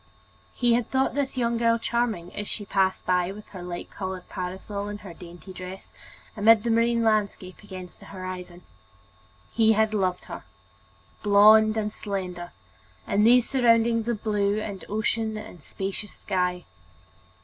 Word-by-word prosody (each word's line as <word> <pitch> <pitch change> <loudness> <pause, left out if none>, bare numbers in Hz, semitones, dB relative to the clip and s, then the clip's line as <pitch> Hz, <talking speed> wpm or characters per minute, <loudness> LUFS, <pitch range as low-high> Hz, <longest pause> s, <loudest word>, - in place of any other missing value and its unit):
He 240 -1 +3
had 235 -1 +1
thought 265 0 +1
this 275 -2 -2
young 235 -1 +1
girl 230 0 +3
charming, 230 -7 -2
as 205 - -5
she 205 - -6
passed 190 -1 +1
by 180 0 +1
with 210 +1 -11
her 185 - -9
light 175 0 -6
colored 190 -2 -5
parasol 190 +3 -5
and 205 0 -6
her 185 -4 -9
dainty 175 +1 -11
dress 185 +1 -9 0.4
amid 215 0 +5
the 235 - 0
marine 230 +1 +2
landscape 205 -4 0
against 185 -3 -10
the - - -14
horizon. 185 -2 -7 0.9
He 220 -1 +4
had 220 0 +2
loved 185 -3 0
her, - - -8 0.8
blond 215 +1 +6
and 210 -1 -1
slender, 180 -4 -5 0.6
in 210 +1 +3
these 245 +1 +6
surroundings 230 -3 +3
of 230 -3 -2
blue 205 -1 +1 0.3
ocean 220 +1 -1
and 180 -5 -10
spacious 195 +6 -6
sky. 180 -2 -1
205 Hz, 150 wpm, -26 LUFS, 185-225 Hz, 0.9 s, blond